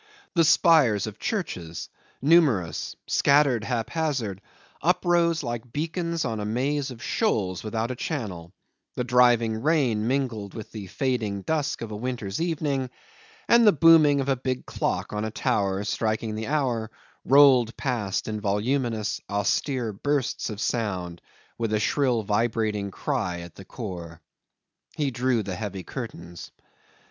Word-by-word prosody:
The 170 - +4
spires 155 - +4
of 105 -1 -8
churches, 90 - -4 0.4
numerous, 135 - +3
scattered 140 -5 +3
haphazard, 120 - -2 0.4
uprose 175 -1 +2
like 120 -1 -5
beacons 165 +2 -2
on 115 -3 -2
a - - -3
maze 135 +6 -1
of 120 -3 -9
shoals 95 - 0
without 110 +2 -2
a - - -4
channel; 100 - -4 0.4
the 125 - -1
driving 120 -3 +3
rain 130 -8 +2
mingled 120 -7 -2
with 110 - -8
the 105 -3 -7
falling 110 -3 -2
dusk 150 -3 -1
of 110 - -6
a - - -4
winter's 115 -1 -4
evening; 145 -6 -1 0.6
and 235 -1 +6
the - - +9
booming 155 -3 +6
of 135 - -4
a 135 - +2
big 130 0 -3
clock - - -2
on 105 0 -2
a 110 - -2
tower, 100 -2 0
striking 110 +1 -1
the 110 +1 -4
hour, 125 -7 0 0.3
rolled 130 -4 +5
past 105 -6 -2
in 110 -1 -3
voluminous, 110 +2 -1
austere 110 +4 0
bursts 140 +5 -1
of 105 -2 -6
sound, 95 -7 -2 0.4
with 115 -2 -1
a 105 - +2
shrill 120 0 +1
vibrating 105 -1 0
cry 100 -7 -2
at 85 -1 -10
the 95 - -12
core. 90 -8 -7 0.8
He 145 -3 0
drew 125 -2 +1
the 95 -2 -4
heavy 100 -1 -5
curtains. 85 - -8
115 Hz, 140 wpm, -25 LUFS, 105-140 Hz, 0.8 s, the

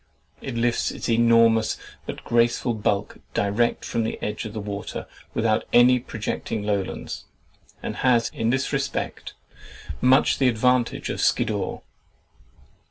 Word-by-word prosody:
It 135 - -5
lifts 120 0 +1
its - - -5
enormous 115 -1 +4 0.3
but - - -6
graceful 120 +1 +2
bulk 105 -2 -1 0.2
direct 105 +4 +1
from 115 - -1
the 110 - -3
edge 105 +1 -4
of 105 - -6
the 110 - -4
water 100 0 -5 0.3
without 110 -1 +1
any 125 +1 +6
projecting 110 -2 -4
lowlands, 100 -2 -3 0.6
and - - -4
has 120 -3 +3
in 115 0 -1
this 130 +4 0
respect 140 0 -3 0.7
much 130 +2 +4
the 135 - +4
advantage 125 +1 +1
of - - -3
Skiddaw. - - 0
115 Hz, 130 wpm, -24 LUFS, 110-120 Hz, 0.7 s, any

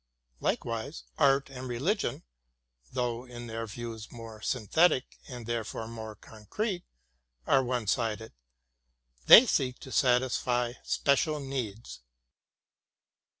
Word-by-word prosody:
Likewise, 115 +6 -2 0.2
art 140 -2 +3
and 130 -1 -7
religion, 150 - -1 0.7
though 120 -1 -2
in 120 -1 -9
their 115 0 -5
views 115 0 -7
more 115 -2 -10
synthetic 130 - +1
and 125 -3 -7
therefore 115 -1 -3
more 110 -2 -7
concrete, 175 - -4 0.6
are 135 - +4
one 125 -2 -1
sided; 110 +1 -1 0.9
they 235 - +11
seek 130 - 0
to 130 - -11
satisfy 125 -2 +2
special 150 +2 +1
needs. 120 - -5
120 Hz, 105 wpm, -29 LUFS, 115-135 Hz, 0.9 s, they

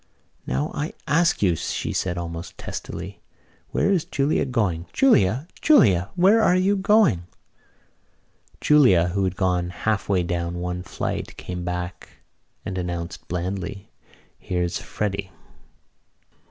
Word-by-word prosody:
"Now, 65 +4 -1
I 150 +2 -3
ask 165 -3 +2
you," 90 -4 +3
she 80 - -3
said 90 -2 -1
almost 85 0 -6
testily, - - -7 0.5
"where 200 - +1
is 180 -5 +2
Julia 140 +2 0
going? 100 -10 -1
Julia! 135 - +3
Julia! 100 - +5
Where 200 +6 +5
are 180 - +4
you 190 +2 +3
going?" 200 - +3 1.3
Julia, 100 - +5
who 100 +2 -1
had 95 0 -2
gone 90 -2 0
half 100 +5 -2
way 95 -3 +2
down 85 0 -2
one 90 0 -3
flight, 95 - -4
came 90 -1 -6
back 90 0 -6 0.4
and 95 -1 -3
announced 85 -1 -5
blandly: 95 +3 -4 0.5
"Here's 90 -1 -2
Freddy." 100 -2 -3
95 Hz, 125 wpm, -23 LUFS, 90-140 Hz, 1.3 s, Julia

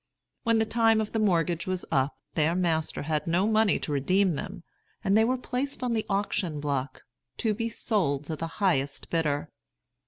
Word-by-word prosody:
When 230 -2 +2
the 220 - +3
time 225 -1 +3
of 215 -1 -2
the 225 - 0
mortgage 175 -4 +1
was 185 -1 -2
up, 135 +2 +1 0.2
their 160 +1 +2
master 165 -5 0
had 150 0 -1
no 175 +4 +2
money 220 -1 +3
to - - -3
redeem 185 +7 +2
them, 165 +3 -5 0.4
and 195 - +3
they 220 - +6
were 255 +3 +1
placed 255 +2 -3
on 245 -2 0
the 220 -1 -1
auction 195 -5 -1
block, 140 -2 -3 0.3
to 220 -2 +1
be 230 +2 -2
sold 180 - 0
to 155 +1 -4
the 165 +2 -4
highest 145 -9 0
bidder. 150 -4 0
180 Hz, 185 wpm, -28 LUFS, 150-220 Hz, 0.4 s, they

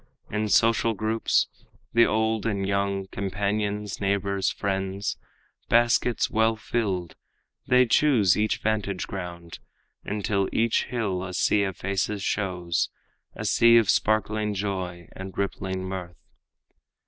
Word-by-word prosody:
In 105 0 -1
social 115 +1 +3
groups, 110 +2 +1 0.5
The 115 0 +6
old 110 0 0
and 100 -3 -1
young, 100 -1 0
companions, 100 +1 -2
neighbors, 100 0 0
friends, 95 0 -2 0.5
Baskets 120 0 +3
well 110 +1 +2
filled, 100 -6 -2 0.5
they 125 -1 +5
choose 120 - +4
each 105 +1 +1
vantage 105 -3 -1
ground, 85 -3 -7 0.4
Until 100 -1 -1
each 115 0 +1
hill 105 -7 -2
a 90 -1 -5
sea 105 - +3
of 95 -2 -4
faces 100 +1 -2
shows, 90 -5 -1 0.5
A - - -5
sea 115 0 +6
of 110 -3 +4
sparkling 110 0 +1
joy 95 -4 -4
and 95 0 -9
rippling 95 -1 -2
mirth. 95 -2 -6
100 Hz, 120 wpm, -26 LUFS, 95-110 Hz, 0.5 s, The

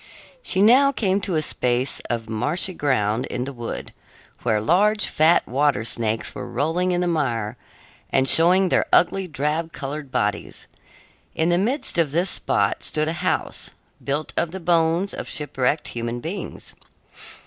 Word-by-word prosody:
She 190 - +1
now 265 +6 +6
came 200 -6 0
to 190 -3 -2
a 155 - +1
space 125 -2 0
of 115 -2 -3
marshy 145 - -1
ground 125 -6 0
in 125 - -3
the 140 +2 -6
wood, 120 -2 -6 0.5
where 110 -3 +1
large, 205 - +2
fat 160 +3 +3
water 135 -3 +1
snakes 110 -1 -2
were - - -7
rolling 170 +5 0
in 175 0 0
the 180 - 0
mire 120 -10 -1 0.5
and 130 0 +2
showing 180 +6 +5
their - - +2
ugly, 190 +2 +3
drab 155 +2 -2
colored 145 0 -6
bodies. 105 -4 -2 0.7
In 160 +2 +1
the 175 0 +3
midst 235 - +1
of 150 -4 +1
this 175 +3 +2
spot - - 0
stood 155 0 +1
a - - -1
house, - - -1 0.3
built 145 +2 -2
of 170 - 0
the 190 +3 -6
bones 170 +2 +1
of - - -5
shipwrecked 145 0 -1
human 120 0 -4
beings. 170 +10 -7
155 Hz, 160 wpm, -22 LUFS, 125-180 Hz, 0.7 s, now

